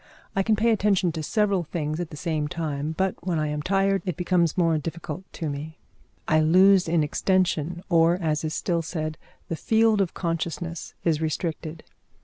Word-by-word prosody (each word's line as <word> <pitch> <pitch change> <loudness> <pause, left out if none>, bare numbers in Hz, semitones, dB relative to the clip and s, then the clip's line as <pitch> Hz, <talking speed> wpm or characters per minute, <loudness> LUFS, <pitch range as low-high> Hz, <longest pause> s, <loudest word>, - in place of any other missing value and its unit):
I 195 - +3
can 215 +3 +2
pay 230 +3 +2
attention 200 -4 +2
to 160 - -4
several 200 +3 +1
things 155 -1 -3
at 175 -2 -3
the 150 - -9
same 155 -2 -1
time, 150 -1 -3
but 190 -1 +1
when 175 -2 -1
I 155 -1 0
am 150 0 -2
tired 195 +3 +1
it 180 -6 -3
becomes 175 -2 +1
more 165 -2 +3
difficult 165 +3 -6
to 165 - -4
me. 150 +2 -5 0.5
I 155 - +4
lose 185 +4 +5
in 165 -1 +2
extension, 175 +1 0
or, 170 -1 +4
as 160 -4 -1
is 155 0 -2
still 170 -2 0
said, 155 -1 -4 0.3
the 165 - -2
field 220 +3 +3
of 185 - -1
consciousness 170 0 -3
is 160 -2 +1
restricted. 160 0 -3
170 Hz, 180 wpm, -25 LUFS, 155-185 Hz, 0.5 s, lose